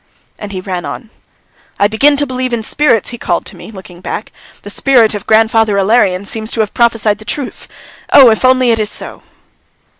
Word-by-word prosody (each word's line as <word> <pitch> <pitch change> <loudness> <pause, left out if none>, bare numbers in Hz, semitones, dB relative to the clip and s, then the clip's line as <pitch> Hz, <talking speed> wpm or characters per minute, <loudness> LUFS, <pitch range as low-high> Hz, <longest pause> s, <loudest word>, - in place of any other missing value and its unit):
And 205 -1 -7
he 185 -2 -5
ran 185 -2 -5
on. 230 -3 -8 0.7
"I 200 - +3
begin 275 +7 +2
to 290 - +1
believe 255 -1 -4
in 230 -2 -2
spirits," 240 -3 +1
he 240 - -8
called 175 - -2
to - - -10
me, 175 +2 -12
looking 190 -4 -13
back. 210 - -6 0.3
"The 205 - -7
spirit 240 -2 +3
of 205 - -7
grandfather 220 -1 +3
Ilarion 195 -2 +1
seems 220 +2 -5
to 225 - 0
have 210 - -3
prophesied 225 -3 +1
the - - -11
truth! 255 +5 -4 0.4
Oh, 260 -4 +8
if 220 - -1
only 255 -1 +3
it 225 - +1
is 210 -1 -1
so!" - - -8
220 Hz, 200 wpm, -13 LUFS, 205-245 Hz, 0.7 s, Oh